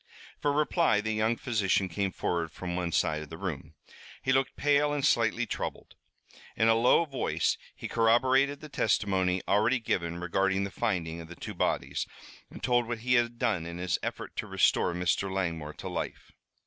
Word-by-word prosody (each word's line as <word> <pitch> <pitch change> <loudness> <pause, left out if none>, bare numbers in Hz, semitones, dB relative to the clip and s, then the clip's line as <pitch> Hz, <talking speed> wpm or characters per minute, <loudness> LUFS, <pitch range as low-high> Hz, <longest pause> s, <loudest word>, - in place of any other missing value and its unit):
For 145 -1 +2
reply 150 - +2
the 110 +1 -1
young 110 +2 +1
physician 100 -5 +1
came 95 +2 -2
forward 85 -2 -2
from 90 +2 -5
one 90 -1 -2
side 75 -1 +1
of 75 - -9
the 80 - -8
room. 85 -7 -5 0.5
He 130 - +2
looked 135 0 +1
pale 145 0 +3
and 145 -2 0
slightly 115 +1 +2
troubled. - - -5 0.6
In 110 - +4
a 115 - +6
low 120 +8 +4
voice 135 -4 0 0.2
he - - -6
corroborated 130 +5 +3
the 155 - -8
testimony 95 -7 +1
already 110 +6 +3
given 85 -6 -2
regarding 95 +2 +1
the 100 - -4
finding 85 -8 -2
of 80 - -10
the 85 - -10
two - - -7
bodies, - - -1 0.4
and - - -12
told 120 -1 +2
what 120 -2 -4
he 125 - +3
had 120 -1 +2
done 90 -8 0
in 85 0 -6
his 90 0 -1
effort - - -5
to - - -3
restore 85 - +2
Mr. 90 +2 0
Langmore 85 -5 -2
to - - -7
life. - - -5
105 Hz, 185 wpm, -29 LUFS, 90-120 Hz, 0.6 s, a